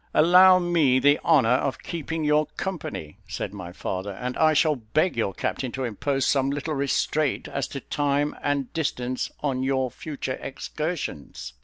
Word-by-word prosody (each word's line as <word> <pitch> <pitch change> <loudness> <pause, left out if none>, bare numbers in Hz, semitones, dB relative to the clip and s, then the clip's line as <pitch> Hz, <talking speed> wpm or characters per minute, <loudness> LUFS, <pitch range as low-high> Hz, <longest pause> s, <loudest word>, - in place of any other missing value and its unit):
"Allow 185 +3 +7
me 170 -7 +3
the 145 +2 +4
honour 150 -8 +4
of 130 +1 0
keeping 160 -1 -4
your 150 0 +3
company," 160 - -5
said - - -4
my 90 -4 -7
father; 95 +2 -4
"and 125 +5 -4
I 155 0 +4
shall 155 0 +3
beg 125 +10 0
your 115 -4 0
captain 125 +6 -3
to 135 - -3
impose 135 +4 -1
some 135 -1 +2
little 145 +3 -2
restraint 140 +1 0
as 140 - -3
to 140 - -6
time 145 0 0
and 140 -3 -1
distance 130 -6 -2
on 135 -3 -1
your 130 -1 0
future 140 -4 -5
excursions." 140 - -5
140 Hz, 160 wpm, -25 LUFS, 125-155 Hz, -, Allow